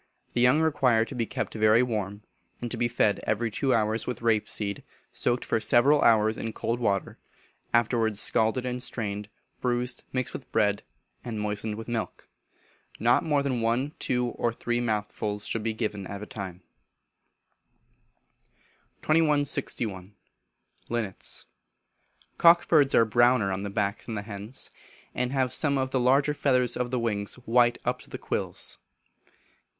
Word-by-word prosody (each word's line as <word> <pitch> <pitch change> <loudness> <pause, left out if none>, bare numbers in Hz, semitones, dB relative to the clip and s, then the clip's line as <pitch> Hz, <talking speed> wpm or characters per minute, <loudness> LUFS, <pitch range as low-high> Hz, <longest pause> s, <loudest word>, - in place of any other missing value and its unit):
The 120 - +1
young 125 +6 +5
require 130 -8 +3
to - - -9
be 115 -2 -2
kept - - -4
very 110 +2 +4
warm, 105 -4 -3 0.4
and 120 -1 -5
to - - -1
be 120 - +1
fed 110 -3 +1
every 115 +1 -1
two 135 +5 0
hours 110 -1 +1
with 125 -1 -4
rape 110 -2 +2
seed, 100 -2 -3 0.3
soaked 120 0 -1
for - - +1
several 140 +6 +4
hours 110 -1 +4
in 115 -1 -4
cold 115 +2 -2
water, 100 -5 -1 0.5
afterwards 115 -2 +2
scalded 115 +4 +2
and 125 0 -3
strained, 105 -4 -4 0.3
bruised, 125 0 -1
mixed 130 -1 -2
with 135 - -8
bread, 100 -1 +2 0.4
and 115 -3 -4
moistened 105 0 -2
with 110 +1 -8
milk. 115 -2 -4 0.7
Not 120 +3 +3
more 145 -3 +1
than 130 -4 -1
one, 120 +5 0
two, 125 -1 0
or 120 - -1
three 120 +1 -2
mouthfuls 105 -2 -2
should 115 - -2
be 115 +1 -1
given 105 -3 -3
at 100 +1 -6
a - - -5
time. 95 -4 -7 2.4
2161. 140 - 0 0.7
Linnets. 115 -5 -3 0.9
Cock 170 +1 +6
birds 145 -4 +4
are 115 - +6
browner 120 -2 +3
on 95 0 -2
the 100 - -4
back 100 0 -2
than 115 - -5
the 100 - -4
hens, 105 +4 -6 0.4
and 125 0 -1
have 130 -3 0
some 140 -3 +3
of 130 0 -1
the 130 - +1
large 140 +4 +3
feathers 125 -4 +2
of 125 0 -2
the 125 - -1
wings 105 -4 0
white 120 +1 +4
up - - 0
to - - -15
the - - -6
quills. - - -2
115 Hz, 155 wpm, -27 LUFS, 105-125 Hz, 2.4 s, Cock